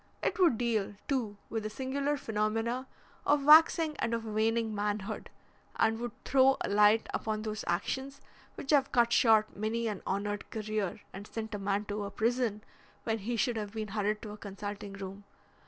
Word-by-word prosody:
It 440 Hz, -, 0 dB
would 335 Hz, -11 st, +5 dB
deal, 220 Hz, -4 st, 0 dB
too, 235 Hz, -8 st, -1 dB
with 225 Hz, -, -1 dB
the 215 Hz, -, -4 dB
singular 275 Hz, +5 st, -1 dB
phenomena 225 Hz, +3 st, -1 dB, 0.4 s
of 290 Hz, -1 st, +3 dB
waxing 315 Hz, +1 st, +7 dB
and 230 Hz, -, 0 dB
of 230 Hz, -1 st, -4 dB
waning 220 Hz, +1 st, 0 dB
manhood, 210 Hz, 0 st, -3 dB, 0.5 s
and 225 Hz, 0 st, +2 dB
would 240 Hz, -2 st, -4 dB
throw 270 Hz, 0 st, +5 dB
a -, -, -1 dB
light 210 Hz, +2 st, +5 dB
upon 215 Hz, -1 st, -2 dB
those 215 Hz, -1 st, -4 dB
actions 265 Hz, +10 st, -2 dB, 0.4 s
which 275 Hz, -, -4 dB
have 275 Hz, -2 st, +4 dB
cut 235 Hz, -1 st, +3 dB
short 220 Hz, -3 st, +4 dB
many 225 Hz, +2 st, -1 dB
an 210 Hz, -4 st, -3 dB
honoured 205 Hz, +1 st, -2 dB
career 215 Hz, -3 st, -3 dB
and 200 Hz, +2 st, -8 dB
sent 220 Hz, -1 st, -5 dB
a 205 Hz, -, -3 dB
man 200 Hz, +1 st, -1 dB
to 205 Hz, 0 st, -3 dB
a 200 Hz, -, -4 dB
prison 225 Hz, -1 st, 0 dB, 0.4 s
when 225 Hz, -1 st, -1 dB
he 230 Hz, +4 st, -3 dB
should 230 Hz, +1 st, +1 dB
have 210 Hz, -1 st, -4 dB
been 215 Hz, -2 st, -4 dB
hurried 210 Hz, +1 st, -1 dB
to 215 Hz, -, -6 dB
a 210 Hz, -, -8 dB
consulting 205 Hz, 0 st, -6 dB
room. 195 Hz, 0 st, -8 dB
220 Hz, 180 wpm, -31 LUFS, 205-240 Hz, 0.5 s, waxing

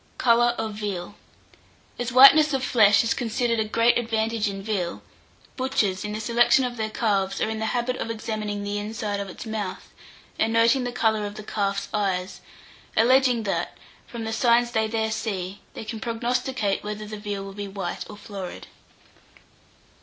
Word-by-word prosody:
COLOUR 240 Hz, 0 st, +4 dB
OF 220 Hz, -1 st, -3 dB
VEAL. 205 Hz, -3 st, -4 dB, 0.9 s
As 245 Hz, +1 st, -2 dB
whiteness 280 Hz, +4 st, +8 dB
of 265 Hz, -, -2 dB
flesh 210 Hz, -5 st, +5 dB
is 230 Hz, -, +1 dB
considered 235 Hz, 0 st, -1 dB
a -, -, +3 dB
great 230 Hz, +3 st, +3 dB
advantage 225 Hz, -2 st, 0 dB
in 195 Hz, 0 st, -6 dB
veal, 180 Hz, -, -3 dB, 0.5 s
butchers, 215 Hz, -8 st, 0 dB
in 210 Hz, -, -4 dB
the 215 Hz, -, -4 dB
selection 240 Hz, +3 st, +3 dB
of 245 Hz, -1 st, -4 dB
their 220 Hz, -2 st, -2 dB
calves, 200 Hz, -4 st, 0 dB
are 220 Hz, -, 0 dB
in 220 Hz, -, -4 dB
the 220 Hz, -, -1 dB
habit 245 Hz, +2 st, -1 dB
of -, -, -4 dB
examining 215 Hz, -2 st, -3 dB
the 205 Hz, 0 st, -2 dB
inside 210 Hz, -1 st, -3 dB
of 200 Hz, -1 st, -5 dB
its 185 Hz, -, -9 dB
mouth, 215 Hz, -4 st, -5 dB, 0.5 s
and 225 Hz, -, +2 dB
noting 230 Hz, +3 st, +3 dB
the 245 Hz, -, -2 dB
colour 220 Hz, -3 st, +1 dB
of 205 Hz, -, -9 dB
the 215 Hz, -, -8 dB
calf's 200 Hz, -2 st, -2 dB
eyes; 190 Hz, -3 st, -1 dB, 0.6 s
alleging 250 Hz, 0 st, +4 dB
that, 200 Hz, -, -2 dB, 0.3 s
from 235 Hz, -3 st, -6 dB
the 225 Hz, 0 st, -3 dB
signs 240 Hz, +1 st, +3 dB
they 220 Hz, -1 st, +1 dB
there 220 Hz, 0 st, -1 dB
see, 200 Hz, -3 st, -4 dB
they -, -, -7 dB
can 220 Hz, +1 st, -5 dB
prognosticate 235 Hz, -2 st, -1 dB
whether 210 Hz, 0 st, -5 dB
the 215 Hz, 0 st, -7 dB
veal 205 Hz, -1 st, -4 dB
will 195 Hz, 0 st, -8 dB
be 205 Hz, 0 st, -5 dB
white 195 Hz, -3 st, -4 dB
or 210 Hz, -, -9 dB
florid. 195 Hz, -4 st, -8 dB
220 Hz, 175 wpm, -25 LUFS, 205-235 Hz, 0.9 s, whiteness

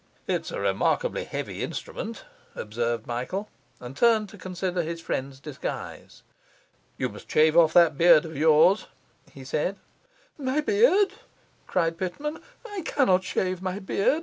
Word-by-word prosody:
'It's -, -, -2 dB
a -, -, -4 dB
remarkably -, -, 0 dB
heavy -, -, -5 dB
instrument,' 225 Hz, -, -5 dB, 0.3 s
observed 115 Hz, +1 st, -2 dB
Michael, 130 Hz, -, -4 dB, 0.3 s
and 125 Hz, +2 st, -9 dB
turned 220 Hz, +2 st, +3 dB
to 205 Hz, -, -12 dB
consider 185 Hz, -1 st, -2 dB
his 165 Hz, +1 st, -4 dB
friend's 135 Hz, -4 st, -4 dB
disguise. 145 Hz, -1 st, -7 dB, 0.7 s
'You -, -, 0 dB
must -, -, -12 dB
shave 155 Hz, +1 st, +4 dB
off 165 Hz, -2 st, +6 dB
that 165 Hz, -5 st, +5 dB
beard 170 Hz, -2 st, +7 dB
of 160 Hz, -1 st, -8 dB
yours,' 160 Hz, +6 st, +4 dB, 0.4 s
he 135 Hz, -, -11 dB
said. 150 Hz, +8 st, -1 dB, 0.6 s
'My 265 Hz, +1 st, 0 dB
beard!' 405 Hz, +1 st, +4 dB, 0.5 s
cried 165 Hz, -2 st, 0 dB
Pitman. 290 Hz, -, -4 dB, 0.3 s
'I 410 Hz, -3 st, -5 dB
cannot 190 Hz, -, +2 dB
shave 185 Hz, -1 st, -2 dB
my 185 Hz, 0 st, -3 dB
beard. 200 Hz, +8 st, +1 dB
180 Hz, 140 wpm, -26 LUFS, 155-215 Hz, 0.7 s, beard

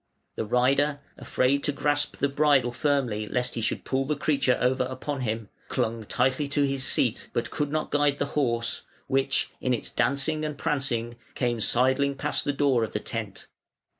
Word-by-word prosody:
The -, -, -2 dB
rider, 140 Hz, +5 st, +2 dB, 0.2 s
afraid 140 Hz, +2 st, +1 dB
to 145 Hz, -, +2 dB
grasp 145 Hz, 0 st, 0 dB
the 140 Hz, -, +2 dB
bridle 140 Hz, -3 st, +3 dB
firmly 120 Hz, -6 st, 0 dB
lest 125 Hz, +2 st, -1 dB
he 115 Hz, -, -3 dB
should 110 Hz, -, -2 dB
pull 135 Hz, 0 st, 0 dB
the 150 Hz, +2 st, 0 dB
creature 140 Hz, -3 st, +1 dB
over 130 Hz, +1 st, +2 dB
upon 130 Hz, +2 st, -4 dB
him, 110 Hz, -3 st, -3 dB, 0.2 s
clung 110 Hz, 0 st, -2 dB
tightly 135 Hz, +6 st, +1 dB
to 145 Hz, +1 st, +1 dB
his 135 Hz, -1 st, 0 dB
seat, -, -, +2 dB
but -, -, -2 dB
could 145 Hz, -1 st, -2 dB
not 155 Hz, 0 st, -2 dB
guide 145 Hz, -1 st, +2 dB
the -, -, 0 dB
horse, 115 Hz, -5 st, +1 dB, 0.2 s
which, 135 Hz, 0 st, 0 dB
in 125 Hz, -1 st, +1 dB
its -, -, -5 dB
dancing 140 Hz, +5 st, 0 dB
and 150 Hz, -2 st, -3 dB
prancing, 120 Hz, -5 st, -1 dB, 0.2 s
came 120 Hz, -2 st, 0 dB
sidling 130 Hz, +5 st, +2 dB
past 135 Hz, -, 0 dB
the 145 Hz, -, +1 dB
door 135 Hz, -4 st, +2 dB
of 110 Hz, -, -4 dB
the 105 Hz, -, -1 dB
tent. 105 Hz, -3 st, -5 dB
135 Hz, 180 wpm, -26 LUFS, 120-145 Hz, 0.2 s, bridle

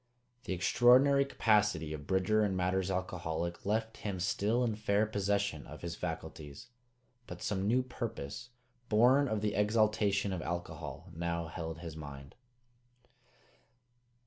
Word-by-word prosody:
The -, -, -2 dB
extraordinary 125 Hz, +9 st, +5 dB
capacity 105 Hz, -, +2 dB
of 75 Hz, -1 st, -8 dB
Bridger 95 Hz, +3 st, +2 dB
in 100 Hz, -2 st, 0 dB
matters 90 Hz, +1 st, 0 dB
alcoholic 85 Hz, -2 st, -3 dB
left 110 Hz, +2 st, -1 dB
him 100 Hz, -3 st, -4 dB
still 105 Hz, +6 st, +1 dB
in 115 Hz, -3 st, +1 dB
fair 105 Hz, 0 st, +1 dB
possession 100 Hz, -5 st, -1 dB
of 75 Hz, -, -11 dB
his 85 Hz, -1 st, -4 dB
faculties; 80 Hz, -, -6 dB, 0.6 s
but 90 Hz, 0 st, -8 dB
some 95 Hz, -1 st, -1 dB
new 125 Hz, +4 st, +3 dB
purpose, 120 Hz, -, -6 dB, 0.4 s
born 125 Hz, +6 st, +5 dB
of 110 Hz, -4 st, -1 dB
the 105 Hz, -1 st, 0 dB
exaltation 105 Hz, -1 st, +2 dB
of 90 Hz, -, -3 dB
alcohol, 85 Hz, 0 st, -5 dB
now 85 Hz, -1 st, -2 dB
held 80 Hz, -1 st, -6 dB
his 85 Hz, -3 st, -7 dB
mind. 70 Hz, -3 st, -9 dB
100 Hz, 130 wpm, -32 LUFS, 85-110 Hz, 0.6 s, extraordinary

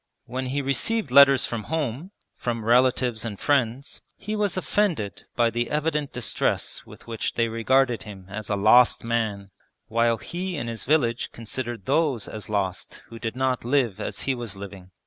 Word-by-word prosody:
When 130 Hz, +2 st, -4 dB
he 140 Hz, +2 st, -1 dB
received 140 Hz, -, +1 dB
letters 140 Hz, -1 st, +7 dB
from 115 Hz, -3 st, -4 dB
home, 155 Hz, +1 st, -2 dB, 0.3 s
from 115 Hz, -2 st, -3 dB
relatives 125 Hz, -1 st, +3 dB
and 110 Hz, -4 st, -5 dB
friends, 135 Hz, -1 st, 0 dB, 0.2 s
he 210 Hz, +2 st, -4 dB
was 205 Hz, -3 st, 0 dB
offended 180 Hz, -, -1 dB
by 120 Hz, -1 st, +3 dB
the 120 Hz, 0 st, -1 dB
evident 150 Hz, -1 st, -1 dB
distress 125 Hz, -1 st, -1 dB
with -, -, -14 dB
which 115 Hz, -2 st, -3 dB
they 115 Hz, -1 st, +2 dB
regarded 120 Hz, +2 st, +2 dB
him 100 Hz, -3 st, -10 dB
as 105 Hz, +1 st, -7 dB
a 105 Hz, -, +1 dB
lost 110 Hz, +5 st, +5 dB
man, 110 Hz, -4 st, -2 dB, 0.4 s
while 115 Hz, 0 st, +2 dB
he 175 Hz, -, -4 dB
in 115 Hz, -, -3 dB
his 115 Hz, -1 st, -5 dB
village 125 Hz, -5 st, +1 dB
considered 115 Hz, -2 st, -5 dB
those 140 Hz, -6 st, +1 dB
as 105 Hz, -2 st, -7 dB
lost 100 Hz, -3 st, -3 dB
who 115 Hz, -, -9 dB
did 115 Hz, 0 st, -4 dB
not 130 Hz, -1 st, 0 dB
live 120 Hz, -5 st, +1 dB
as -, -, -4 dB
he 135 Hz, -, 0 dB
was 120 Hz, -5 st, -4 dB
living. 95 Hz, -2 st, -9 dB
120 Hz, 170 wpm, -25 LUFS, 110-140 Hz, 0.4 s, letters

